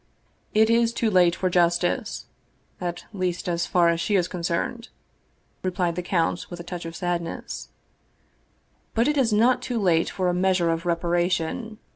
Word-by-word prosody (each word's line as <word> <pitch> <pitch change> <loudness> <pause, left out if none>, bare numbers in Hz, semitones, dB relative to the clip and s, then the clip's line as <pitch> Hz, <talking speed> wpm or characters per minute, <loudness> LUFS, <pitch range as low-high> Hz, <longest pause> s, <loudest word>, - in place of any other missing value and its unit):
" - - -41
It 220 +1 +5
is 230 0 +3
too 230 -2 0
late 175 -2 +4
for 185 - -1
justice, 175 +5 +1 0.6
at 175 -1 -4
least 185 -3 -2
so 175 - 0
far 170 0 +3
as 170 0 0
she 205 - +1
is 180 -2 +2
con 180 - -6
cerned," 225 +8 -2 0.7
replied 180 -2 0
the 180 - -2
count, 175 -1 -1
with 175 - -8
a - - -6
touch 175 -1 -6
of 165 0 -6
sadness; 175 -2 -4 0.6
" - - -41
but 230 +2 +3
it 295 - +2
is 260 -5 +2
not 240 +4 +3
too 245 -2 -2
late 170 -5 +2
for 185 -1 -1
a 180 - +2
measure 180 -2 +2
of 165 +2 -3
reparation. 175 +5 0
180 Hz, 180 wpm, -25 LUFS, 170-215 Hz, 0.7 s, It